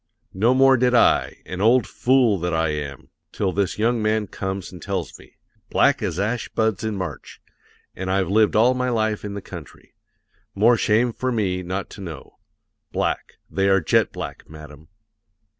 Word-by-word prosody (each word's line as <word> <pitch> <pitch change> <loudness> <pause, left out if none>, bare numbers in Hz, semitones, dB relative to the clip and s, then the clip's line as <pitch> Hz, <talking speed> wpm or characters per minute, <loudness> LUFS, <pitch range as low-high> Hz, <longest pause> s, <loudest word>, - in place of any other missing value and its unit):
No 115 +7 +2
more 135 0 +5
did 125 0 +2
I - - +3
an 90 +1 -5
old 120 +4 +4
fool 125 -6 +2
that 85 0 -1
I 80 -1 +1
am! 70 -3 -5 0.2
till 95 -2 -1
this 100 0 -1
young 115 +2 +1
man 110 0 +1
comes 95 0 -5
and 90 - -11
tells 95 -5 -4
me. - - -19 0.3
'Black - - +3
as - - -2
ash 115 +4 -1
buds 110 -1 0
in 110 -2 -2
March.' 90 -1 -7 0.6
And 95 0 -4
I've 95 -1 +1
lived 105 +3 +3
all 120 +4 +5
my 125 0 -1
life 110 -3 0
in 100 -1 -5
the 100 - -6
country. 85 -6 -11 0.6
More 115 +5 +5
shame 115 +2 +2
for 130 +2 -2
me 95 -6 -1
not 95 +2 -4
to - - -10
know. 85 -5 -9 0.5
Black; - - -2
they 95 0 0
are 95 0 +5
jet 80 - +2
black, - - -8
madam." 75 0 -12
100 Hz, 175 wpm, -22 LUFS, 90-115 Hz, 0.6 s, more